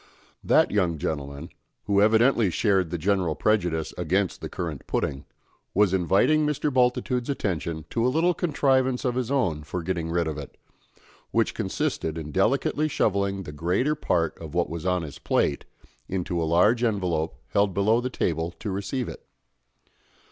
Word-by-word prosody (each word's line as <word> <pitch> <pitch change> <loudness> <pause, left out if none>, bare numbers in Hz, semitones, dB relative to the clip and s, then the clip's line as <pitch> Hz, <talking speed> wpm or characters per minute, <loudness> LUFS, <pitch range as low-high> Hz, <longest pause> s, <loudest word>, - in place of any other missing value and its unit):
That - - +4
young 90 -6 +1
gentleman, 70 +1 -4 0.3
who 100 -1 +2
evidently 110 0 +4
shared 95 -2 +1
the 85 - -2
general 90 -2 +1
prejudice 85 -6 0
against 90 +3 0
the - - -5
currant 80 -5 -5
pudding, 70 +1 -2 0.5
was 100 -1 +4
inviting 95 - +3
Mr. 150 -1 0
Bultitude's 125 0 +1
attention 85 - -2
to 115 - 0
a 125 - +3
little 165 +6 +2
contrivance 135 -7 +1
of 125 - +1
his 125 -1 -2
own 95 - 0
for 80 +4 -5
getting 85 -2 -2
rid 85 0 +1
of 75 -1 -3
it, 70 - -10 0.7
which - - +1
consisted 80 0 -2
in 75 -2 -6
delicately 135 - +1
shovelling 100 -8 0
the 75 - -8
greater 90 - 0
part 85 - 0
of 80 -1 -9
what 85 -2 0
was 85 +2 -4
on 90 -1 +1
his 75 -2 -8
plate 70 - 0 0.4
into 90 -2 -2
a - - +1
large 105 +8 +4
envelope 90 -7 0
held 100 -3 +1
below 110 +4 +3
the 125 - -2
table 80 -8 -1
to 105 - -4
receive 100 +6 -3
it. - - -8
95 Hz, 160 wpm, -25 LUFS, 80-120 Hz, 0.7 s, That